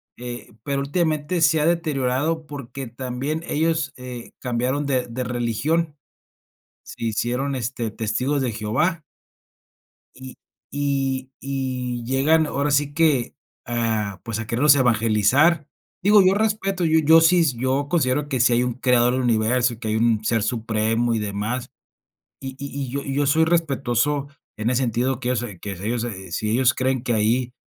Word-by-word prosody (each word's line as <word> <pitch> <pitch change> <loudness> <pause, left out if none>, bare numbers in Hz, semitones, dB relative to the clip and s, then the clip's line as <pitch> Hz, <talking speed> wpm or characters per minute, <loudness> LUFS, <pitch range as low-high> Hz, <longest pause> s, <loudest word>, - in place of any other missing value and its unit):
eh, 120 -1 -8
pero 140 +1 -1
últimamente 155 +3 -1
se 160 0 +4
ha 150 - +1
deteriorado 155 -1 0
porque 140 -2 -7
también 130 +6 -4
ellos, 160 -1 0
eh, 125 -2 -8
cambiaron 125 +3 -1
de 130 -3 0
de 125 +2 -4
religión. 145 +7 -1 0.9
Se - - -10
hicieron, 125 +5 -1
este, 120 -1 -3
Testigos 125 +7 -1
de 125 -3 -1
Jehová. 150 - -1 1.1
Y 130 0 -10 0.4
y 135 -2 -1
y 130 -3 -3
llegan 150 +5 +3
ahora 145 0 -1
sí 145 0 +1
que, 150 -6 +2 0.3
ah, 110 -4 -2
pues, 115 -2 -4
a 110 - -5
querernos 140 +4 +4
evangelizar. 125 - +3 0.3
Digo, 205 +2 +6
yo 185 - +5
respeto, 200 -3 0
yo 160 0 +4
yo 160 +1 +6
sí, 170 +1 +5
yo 130 +3 0
considero 145 -3 +1
que 130 - -1
sí 120 0 +4
hay 120 +1 +3
un 125 -1 -1
creador 125 -1 +3
del 130 - 0
universo, 120 0 +1
que 110 -3 -4
hay 110 - 0
un 110 -1 +2
ser 115 0 +1
supremo 115 +1 0
y 115 - 0
demás. 105 +5 -3 0.7
Y 135 -1 -7
y 140 -1 -5
yo, 140 +2 -3
y 135 - -4
yo 145 +1 +1
soy 160 +3 +4
respetuoso 145 -4 0 0.3
en 110 +2 -1
ese 130 +1 +1
sentido 125 +1 0
que 125 - -3
ellos 125 -2 +1
se 105 -7 -7
que 100 +3 -6
ellos 110 +6 -3
se 95 -6 -6
si 105 +5 -2
ellos 125 +2 +3
creen 130 -1 0
que 120 - -1
ahí 120 +3 +1
130 Hz, 165 wpm, -22 LUFS, 120-145 Hz, 1.1 s, Digo